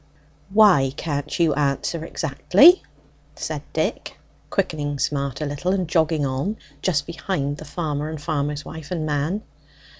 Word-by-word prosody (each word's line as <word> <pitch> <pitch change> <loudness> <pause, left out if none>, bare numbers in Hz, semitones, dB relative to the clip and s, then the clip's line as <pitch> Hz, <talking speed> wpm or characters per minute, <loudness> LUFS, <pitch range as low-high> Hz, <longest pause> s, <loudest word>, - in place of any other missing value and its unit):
"Why 190 -11 +5
can't 145 -2 -3
you 165 -3 +4
exactly 145 +3 0 0.7
answer?" 360 - +5 0.6
said - - -4
Dick, - - -2 0.3
quickening 150 -7 -1
Smart 140 0 -1
a - - 0
little, 145 +6 -1
and 185 -3 0
jogging 160 -2 +2
on 135 +11 -2 0.2
just 150 -6 +1
behind 165 -4 -3
the 155 - -9
farmer 150 -1 -3
and 155 -1 -5
farmer's 150 -1 -2
wife 160 -2 -8
and 165 -4 -2
man. 155 +8 -1
150 Hz, 140 wpm, -23 LUFS, 145-170 Hz, 0.7 s, Why